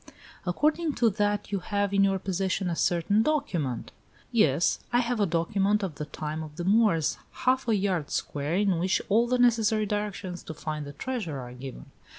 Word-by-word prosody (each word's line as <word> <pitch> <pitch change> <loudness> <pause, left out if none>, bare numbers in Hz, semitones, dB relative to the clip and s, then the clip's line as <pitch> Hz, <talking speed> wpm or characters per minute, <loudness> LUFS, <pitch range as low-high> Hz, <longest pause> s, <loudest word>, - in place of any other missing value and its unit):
"According 305 - +1
to 230 -2 +3
that 205 0 -1
you 200 - 0
have 200 +1 -1
in 195 0 +4
your 195 -1 +3
possession 190 0 -1
a - - -1
certain 175 +6 +2
document 195 - -1 0.2
" - - -30
"Yes; 170 - +3
I 240 - +3
have 245 -1 0
a 205 - +3
document 195 +5 +1
of 185 -5 -2
the - - -2
time 155 +1 -4
of 155 -1 -8
the 175 - -4
Moors, 195 -5 +3 0.3
half 255 0 +3
a 225 - +3
yard 190 -6 0
square, 145 +3 -2
in 195 -3 +2
which 185 +2 +2
all 230 +4 +4
the 250 +1 +2
necessary 225 -3 +3
directions 205 -3 -3
to 160 - -7
find 150 -1 -4
the 145 - -8
treasure 215 - -4
are 125 -1 -8
given." 130 +1 -9
195 Hz, 190 wpm, -27 LUFS, 165-220 Hz, 0.3 s, in